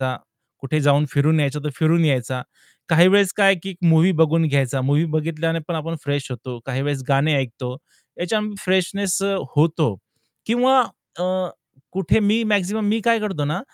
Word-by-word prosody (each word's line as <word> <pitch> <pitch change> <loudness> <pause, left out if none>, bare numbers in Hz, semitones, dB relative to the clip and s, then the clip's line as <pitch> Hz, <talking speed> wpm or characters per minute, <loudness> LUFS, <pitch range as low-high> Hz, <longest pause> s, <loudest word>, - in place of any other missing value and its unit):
का 130 -1 -2 0.4
कुठे 145 +3 -1
जाऊन 145 +1 +3
फिरून 150 +2 +2
यायचं, 145 0 -1
तर 150 - -2
फिरून 165 +1 +2
यायचा. 130 -3 0 0.5
काही 170 +3 +6
वेळेस, 200 0 +4
काय 200 -2 +4
आहे 195 -1 +5
की 195 - -5
एक 180 - -10
मूव्ही 165 +4 +5
बघून 160 +1 +3
घ्यायचा, 135 -1 0
मूव्ही 145 +4 +2
बघितल्याने 165 +1 -1
पण 170 - -2
आपण 165 +1 -4
फ्रेश 145 -1 -2
होतो. 125 0 -7
काही 135 0 -2
वेळेस 145 -2 -2
गाणे 140 +2 +2
ऐकतो, 125 0 -4 0.4
याच्या 210 +5 0 0.2
फ्रेशनेस 190 +1 0
अ, 200 0 0 0.2
होतो 155 - +2 0.5
किंवा 255 +3 +4 0.4
अ, - - 0 0.7
कुठे 195 +3 +1
मी 215 +3 +2
मॅक्सिमम 205 0 0
मी 225 +2 +1
काय 230 -1 +3
करतो 190 -9 -3
ना 165 +6 -2
160 Hz, 175 wpm, -21 LUFS, 140-195 Hz, 0.7 s, काही